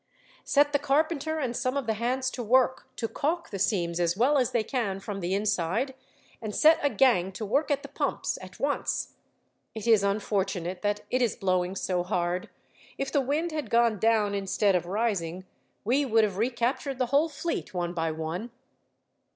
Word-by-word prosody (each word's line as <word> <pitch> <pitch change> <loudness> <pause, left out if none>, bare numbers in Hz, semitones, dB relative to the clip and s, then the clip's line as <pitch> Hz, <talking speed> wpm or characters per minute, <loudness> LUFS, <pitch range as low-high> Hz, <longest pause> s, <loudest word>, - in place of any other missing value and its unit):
"Set 290 +1 +3
the 285 - +3
carpenter 310 +2 0
and 255 -5 -2
some 255 +3 -1
of 275 - -2
the 225 - +1
hands 255 +4 -1
to 250 - -5
work, 255 +2 +2
to 225 - -2
caulk 330 +8 -2
the 195 - -4
seams 175 -4 0
as 175 +1 +1
well 275 +6 +4
as 250 - +2
they 235 - +1
can 210 -5 -2
from 195 0 -5
the 180 +1 -1
inside, 205 +5 0 0.5
and 215 -2 -5
set 320 +1 +6
a 285 - +2
gang 230 -10 +3
to 215 +3 -5
work 275 +10 +1
at 280 -1 0
the - - -7
pumps - - -2
at - - -12
once. - - -1 0.6
It 220 - -5
is 225 -3 +5
unfortunate 195 -3 -1
that 205 0 0
it 255 - +1
is 240 -4 +1
blowing 185 -3 0
so 180 -2 -1
hard. 180 -1 -1 0.5
If 275 0 -3
the 285 - +3
wind 300 +6 -1
had 305 -1 -4
gone 230 -3 +3
down 220 -2 +2
instead 200 0 +1
of 175 -1 0
rising, 185 -4 -1 0.4
we 260 +7 +2
would 225 -4 +3
have 200 -3 -1
recaptured 245 +4 -1
the 255 - +1
whole 305 +4 +4
fleet, 310 -6 -4
one 175 -2 -2
by 165 -2 -1
one." 160 +8 -4
220 Hz, 190 wpm, -28 LUFS, 190-265 Hz, 0.6 s, set